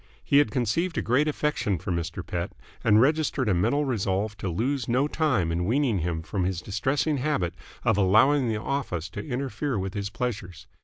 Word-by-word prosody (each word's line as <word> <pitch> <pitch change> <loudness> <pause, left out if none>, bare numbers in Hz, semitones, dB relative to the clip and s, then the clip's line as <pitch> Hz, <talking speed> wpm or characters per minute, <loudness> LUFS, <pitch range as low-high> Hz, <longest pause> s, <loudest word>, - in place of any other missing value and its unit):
He 140 - +4
had 145 - +3
conceived 145 - 0
a - - 0
great 130 +6 +2
affection 140 -9 0
for 90 +3 -5
Mr. 85 0 -3
Pett, 85 -1 -3 0.3
and 105 -1 +5
registered 145 -1 +2
a 105 - +3
mental 115 +12 +1
resolve 105 -3 -1
to 95 - -2
lose 125 - -1
no 130 +4 +2
time 140 - +1
in 85 +1 0
weaning 120 -1 +1
him 80 -1 -2
from 95 +2 -2
his 90 -1 -1
distressing 135 - 0
habit 125 - 0 0.3
of 110 -4 +3
allowing 115 +7 +4
the 110 -1 -1
office 105 - -3
to - - -6
interfere 135 -1 -2
with 95 0 -3
his 100 -2 -3
pleasures. 105 -6 -4
110 Hz, 190 wpm, -26 LUFS, 95-140 Hz, 0.3 s, and